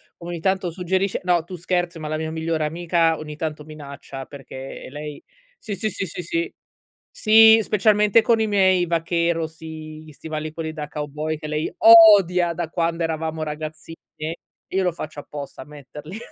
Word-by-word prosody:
come 170 - -10
ogni 170 - -4
tanto 190 -1 0
suggerisce 185 +3 -1
no, 175 -2 +2
tu 180 +2 -8
scherzi, 175 0 -2
ma 155 -1 -6
la 155 - -2
mia 160 0 -3
migliore 160 -1 -2
amica 165 0 +1
ogni 150 -1 -8
tanto 155 -1 -4
minaccia 140 -3 -9
perché 135 -1 -9
lei 150 0 -8 0.3
sì, 215 - -6
sì, 215 +3 -2
sì, 195 - -4
sì, 180 +1 -6
sì, 335 - -3 0.6
sì, 220 +1 +7
specialmente 210 +1 +3
con 225 0 +2
i 220 - +2
miei 190 -3 +3
vaquero, 170 0 0
sì, 155 -1 -10
gli 155 -1 -14
stivali 155 +1 -6
quelli 160 -1 -4
da 150 -2 -6
cowboy 150 +1 -4
che 155 - -8
lei 150 +1 -2
odia 200 -6 +7
da 165 -1 -4
quando 165 0 -1
eravamo 160 -1 -2
ragazzine 155 +1 -6 0.2
e 155 +2 -4 0.3
io 190 - 0
lo 180 -1 +1
faccio 155 -2 -7
apposta 145 -1 -9
a - - -8
metterli 150 +4 -10
165 Hz, 175 wpm, -22 LUFS, 155-180 Hz, 0.6 s, sì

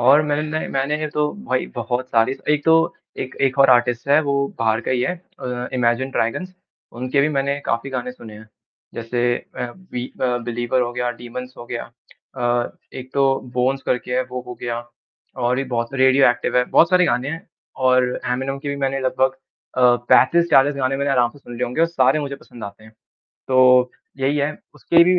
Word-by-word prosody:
और 135 +5 +6
मैंने 150 0 0
ना 155 +1 -2
मैंने 150 +3 -1
तो 150 0 +1 0.2
भाई 130 0 0
बहुत 120 +2 -2
सारी 115 +2 +2 0.2
एक 150 -1 0
तो 160 - +6 0.5
एक 130 - -5
एक 135 +1 -3
और 135 -1 +6
आर्टिस्ट 120 0 +2
है 145 +2 +6
वो 140 -1 0 0.2
बाहर 115 0 +1
का - - -4
ही 130 -1 +1
है 180 - 0 0.3
अ, 125 0 -4
इमैजिन 125 +1 +1
ड्रैगन्स 185 +11 -2 0.5
उनके 130 +2 +1
भी 145 - +3
मैंने 140 -1 0
काफ़ी 115 +4 -1
गाने 125 -1 -3
सुने 110 -4 -12
हैं। 110 +1 -13 0.5
जैसे 120 +1 0 0.2
अ, - - -3
बि 155 -10 -6 0.2
अ, 125 -1 +2
बिलीवर 120 +2 -1
हो 120 0 -3
गया 125 0 -1
डिमन्स 125 +2 -8
हो 120 - -9
गया। 120 0 -4 0.5
अ 120 -1 0 0.3
एक 130 0 -12
तो 140 -1 +3 0.3
बोन्स 130 +2 +1
करके 125 0 -1
है 130 - +2
वो 125 0 -4
हो 125 - -7
गया 120 -1 -3 0.6
और 120 +1 +2
भी 135 - -1
बहुत 120 -2 -2
सारे 130 -1 +2
रेडियोएक्टिव 130 -2 +3
है 125 - +4
बहुत 165 - +4
सारे 180 -1 +5
गाने 130 -3 0
हैं 160 +3 -6 0.4
और 130 0 +5 0.3
एमिनेम 135 +2 -2
के 145 - -6
भी 140 - -2
मैंने 135 -1 -1
लगभग 130 0 +1 0.4
अ, 125 -1 +5
35-40 145 -2 +5
गाने 135 0 0
मैंने 140 +1 -1
आराम 120 -3 +3
से 145 - -17
सुन 120 -3 -11
लिए 125 - 0
होंगे 125 +5 -3
और 165 - +5
सारे 135 -3 +3
मुझे 140 -1 -4
पसंद 120 -4 -12
आते 100 +1 -10
हैं। 110 - -16 0.6
तो 125 -1 +5 0.3
यही 135 +2 +1
है 145 +2 -1 0.2
उसकी 170 0 +4
भी 180 +1 +4
130 Hz, 205 wpm, -21 LUFS, 120-140 Hz, 0.6 s, और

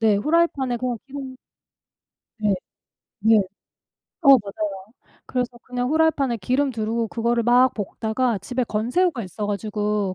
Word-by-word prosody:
네 215 -3 +4
프라이팬에 275 -3 +1
그냥 250 -1 -2
기름 270 -1 -7 1.1
예. 205 -2 +3 0.7
네. 220 -1 +5 0.8
어 - - +2
맞아요. 205 -4 +1 0.3
그래서 250 -1 -1
그냥 250 0 -3
프라이팬에 310 -6 +2
기름 265 +8 +1
두르고 225 0 -2
그거를 235 +1 0
막 245 +2 +5
볶다가 220 +2 -1
집에 250 +6 -2
건새우가 245 +7 0
있어 200 +2 -5
가지고 210 -1 -1
235 Hz, 290 characters per minute, -23 LUFS, 210-260 Hz, 1.1 s, 네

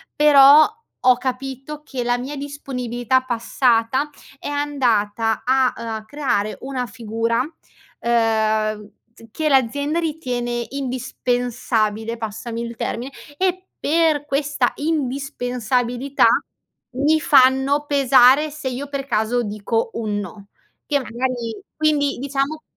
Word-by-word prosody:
però 290 0 +8 0.4
ho 255 -1 +4
capito 265 +3 -5
che 265 -4 -4
la 245 0 0
mia 275 +4 -5
disponibilità 260 -3 -2
passata 245 +2 +1 0.3
è - - -7
andata 235 -7 0
a, 260 0 +3
uhm, 230 - -7
a 220 -1 -5
creare 220 -5 -1
una 260 -2 -3
figura, 230 -1 -2
uhm, 220 -7 -1 0.2
z 230 - -15
che, 310 +5 -1
l'azienda 285 +4 +1
ritiene 245 -7 -2
indispensabile, 245 -4 -2
passami 225 +1 -5
il 235 0 -6
termine, 245 +4 -4 0.3
e 370 0 -1
per 315 -1 +2
questa 280 -2 0
indispensabilità 260 -3 -1 0.7
mi 305 +3 +3
fanno 275 0 +4
pesare 275 +1 +5
se 290 -3 -5
io 260 +3 -5
per 280 -1 -4
caso 240 -1 0
dico 215 +2 -2
un 210 -3 -2
no, 200 0 -9 0.4
che 290 - +2
magari 240 -2 -4
quindi, 300 -2 +1
diciamo, 280 +3 -2
255 Hz, 115 wpm, -21 LUFS, 230-285 Hz, 0.7 s, però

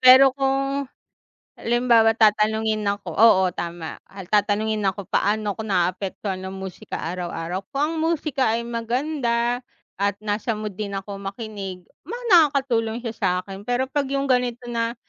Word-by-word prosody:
pero 260 +1 +9
kung 275 0 0 0.7
halimbawa 235 -2 +4
tatanungin 215 -1 +2
ako 200 -5 -3
oo, 190 -4 +6
tama. 170 -1 -6 0.3
Tatanungin 210 +1 +2
ako, 195 0 -3
"Paano 210 0 0
'ko 220 - -2
naaapektuhan 185 +1 -1
ng 190 0 -6
musika 190 -1 -6
araw-araw? 180 +1 -4
Kung 275 - +1
ang 310 +2 0
musika 305 -7 +1
ay 235 - -1
maganda, 235 0 -1 0.4
at 200 0 +1
nasa 215 +2 -1
mood 210 -2 -5
din 200 -2 -3
ako 195 +1 -6
makinig. 195 -2 -6 0.2
Ma 430 - -5 0.2
nakakatulong 270 - +4
siya 230 -2 -3
sa'kin. 195 -1 -2
Pero, 245 +2 +1
'pag 285 0 0
'yong 275 0 -1
ganito 250 -1 +1
na, 230 0 -1
220 Hz, 140 wpm, -23 LUFS, 195-250 Hz, 0.7 s, pero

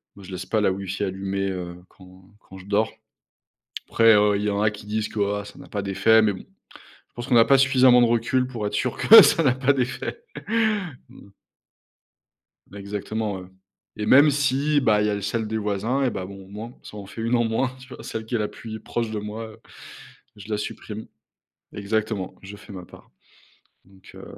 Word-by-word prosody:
moi, 100 - -13
je 95 - -11
laisse 90 0 -6
pas 110 - +1
la 100 - +2
wifi 95 +1 -4
allumée, 95 0 -2
heu, 90 -2 -5
quand 95 0 -18 0.2
quand 95 - -14
je 95 - -13
dors, 105 +2 0 1.0
après, 115 -1 +5
heu, 105 0 +4
il 100 - -3
y 105 - 0
en 100 0 -1
a 105 0 +2
qui 105 0 -11
disent 110 0 -2
que: 110 - -6 0.2
«Ah! 100 - -12
Ça - - -13
n'a - - -12
pas 100 - -3
d'effet!» 100 +3 +3
mais 105 -2 +2
bon, 95 - -9 0.5
je - - -29
pense 120 +1 -6
qu'on 130 - +2
n'a 115 -1 +7
pas 135 - +5
suffisamment 130 -2 +5
de 120 - +5
recul 120 +2 +1
pour 115 -5 -5
être 105 - -6
sûr 125 +3 -1
que 225 0 +10
ça 165 - +4
n'a 130 -4 +4
pas 130 +1 +2
d'effet! 130 - -3 2.5
Exactement, 100 +1 -4
ouais 90 - -12 0.5
et 105 - -2
même 145 +6 +7
si, 145 +1 +1
bah, 110 -5 +3
il 105 - +1
y - - +1
a 100 0 -2
celle 110 +2 -2
des 110 - -2
voisins 110 +6 -1
et 130 - +1
ben, 95 -4 -5
bon, 95 +1 -10
au - - -17
moins 110 +4 -9
ça - - -11
en 100 -2 -8
fait 115 - -9
1 115 +2 0
en 120 - +3
moins, 125 +3 -1
tu 130 - -14
vois, - - -11
celle 110 0 -6
qui 120 - -2
est - - 0
la 105 - 0
puis 110 +1 -9
proche 115 +1 -4
de 110 - -3
moi, 105 +2 -6
heu, - - -18 0.8
je 105 +1 -12
la 105 - 0
supprime. 105 +1 -7 0.7
Exactement, 105 -1 -2
je 100 +1 -10
fais 105 - -14
ma 90 -2 -9
part, - - -17 0.7
donc 95 0 -18
heu, - - -10
105 Hz, 215 wpm, -24 LUFS, 100-120 Hz, 2.5 s, que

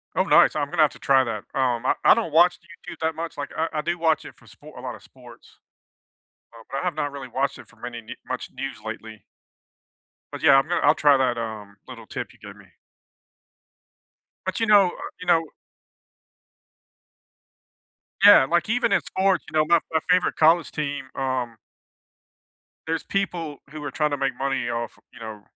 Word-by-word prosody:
Oh, - - +3
nice. - - +5
I'm 145 -2 -1
gonna 170 0 +1
have 155 - +4
to - - -15
try 135 -1 +4
that. 115 -4 -5
Um, 125 -2 0
I - - +3
I - - +8
don't 215 -9 -2
watch 175 +2 +5
YouTube 170 0 -12
that 160 0 -1
much, 165 +1 -6
like, 145 - -4
I 160 - 0
I 155 - -1
do 170 +3 -2
watch 160 -2 +1
it - - -11
for 120 - -23
spo 120 +8 -15
a - - -8
lot 130 -1 -6
of - - -16
sports, 120 -2 -17 1.0
Uh, 115 -1 -14
but 135 - -3
I - - -3
have 180 - -1
not 145 -2 -3
really 135 -2 -8
watched 135 +3 -2
it 130 - -14
for 120 - -21
many 120 +1 -7
ne 115 - -10
much 130 -1 -5
news 135 -4 -5
lately. 110 -1 -8 1.1
But, - - -7
yeah, 140 -3 +7
I'm 135 +3 +4
gonna 175 - 0
I'll 150 +2 +4
try 145 -2 +4
that, 125 -2 +1
um, 110 -3 -6
little 115 -3 -10
tip - - -6
you - - -22
gave - - -11
me. - - -17 1.8
But, - - -2
you 225 - +2
know, 205 -3 +6
uh, - - -7
you 180 - -9
know 170 -2 +5 2.8
Yeah, 205 -10 +9
like, 175 +7 0
even 240 -1 +1
in 200 - +3
sports, 190 -1 0
you 155 - -1
know, 155 - +4
my 170 +1 +5
my 160 - +2
favorite 180 0 +3
college 165 +1 +4
team, 145 -2 -4
um 130 -3 -2 1.3
there's 165 0 -2
people 170 -7 -3
who 155 -1 -8
are 145 - -4
trying 150 +2 0
to 145 - -1
make 135 -2 -2
money 135 -2 -1
off, 120 0 -4 0.2
you 125 - -14
know, 110 -2 -8
140 Hz, 200 wpm, -24 LUFS, 125-165 Hz, 2.8 s, Yeah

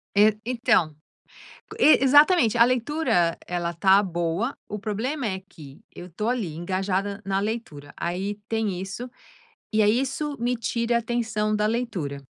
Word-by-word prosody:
É. 210 +1 +5
Então, 230 -10 +1 0.8
e 310 - +6
exatamente, 290 - +5
a 230 - +8
leitura 245 - +1
ela 175 -1 -2
está 190 +3 +4
boa, 175 +6 -2
o 210 - -5
problema 230 +7 -3
é 190 -2 -3
que 140 -3 -14
eu 175 - -9
estou 210 +6 -4
ali 215 -11 -2
engajada 190 +3 -2
na 195 0 0
leitura, 200 -10 -5
aí 190 +4 -3
tem 215 -5 -1
isso, 215 +6 -6 0.6
e 215 - +3
é 205 - +4
isso 270 +5 -1
me 245 +1 0
tira 235 +1 -1
a - - +4
atenção 220 -2 -1
da 210 0 +1
leitura, 190 - -3
210 Hz, 150 wpm, -24 LUFS, 180-240 Hz, 0.8 s, a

